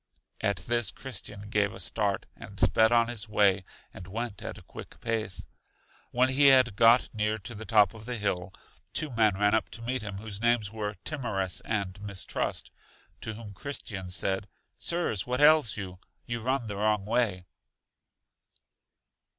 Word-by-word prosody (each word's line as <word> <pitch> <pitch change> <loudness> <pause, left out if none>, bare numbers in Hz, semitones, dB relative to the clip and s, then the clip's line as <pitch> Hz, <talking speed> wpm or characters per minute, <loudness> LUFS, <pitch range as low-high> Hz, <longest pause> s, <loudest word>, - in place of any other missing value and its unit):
At 100 -2 +1
this 120 0 0
Christian 110 -5 -6
gave 105 -1 0
a - - -9
start, 100 -3 -1
and - - -10
sped 110 0 +4
on 115 -1 +4
his 115 -2 -2
way, 100 -2 +3 0.3
and 90 - -10
went 115 +2 -4
at - - -6
a - - -13
quick - - -11
pace. 110 -4 -2 0.6
When 125 +1 +3
he 140 +2 +5
had 130 -5 +6
got 115 +3 +5
near 105 0 0
to 100 +3 -7
the 110 0 -8
top 105 -4 +5
of 110 -1 -11
the 125 0 -3
hill, 95 -3 -1 0.4
two 155 -3 -1
men 110 -4 +3
ran 105 +1 +3
up 110 - +1
to 115 - -7
meet 130 +2 -1
him, 100 -2 -5
whose 105 0 -6
names 120 -4 +2
were 105 -1 -3
Timorous 95 - -2
and 100 -3 -2
Mistrust, 100 -3 -3 0.5
to 110 - -4
whom 105 -2 -9
Christian 100 -4 -5
said, 95 +2 0 0.3
Sirs, 170 - +1
what 125 +1 -1
ails 150 -7 +6
you? 95 -3 -6 0.3
You 120 -1 -3
run 130 +1 0
the 105 -2 -5
wrong 105 -1 +1
way. 105 -5 0
110 Hz, 165 wpm, -29 LUFS, 100-120 Hz, 0.6 s, had